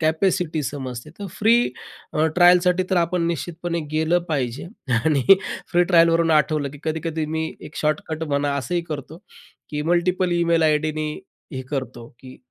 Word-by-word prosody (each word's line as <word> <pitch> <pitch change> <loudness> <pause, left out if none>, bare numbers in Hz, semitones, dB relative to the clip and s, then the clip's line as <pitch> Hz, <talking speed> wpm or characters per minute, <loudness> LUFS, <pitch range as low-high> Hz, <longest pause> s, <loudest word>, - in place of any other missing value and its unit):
Capacity 160 0 +1
समजते. 130 -1 -6
तर 200 - -5
free 225 +3 +5 0.6
अ, 155 +1 +2
ट्रायलसाठी 180 0 +5
तर 190 - +2
आपण 170 0 +1
निश्चितपणे 170 +1 -3
गेलं 160 +3 +2
पाहिजे 135 -4 -2 0.4
आणि 145 -5 +2 0.5
फ्री 175 0 +5
ट्रायलवरून 165 -2 +4
आठवलं 150 -2 +2
की 145 - -11
कधी-कधी 160 0 -2
मी 160 0 -2
एक 155 - -11
शॉर्टकट 155 +1 -2
म्हणा 145 -1 0
असंही 175 +6 -1
करतो, 150 +1 -6 0.5
की 150 0 -2
मल्टिपल 180 +1 +1
ईमेल 170 -1 +2
आयडीनी 155 0 0 0.4
हे 130 -1 -4
करतो, 130 -4 -5
की 130 0 -12
160 Hz, 145 wpm, -22 LUFS, 150-175 Hz, 0.6 s, फ्री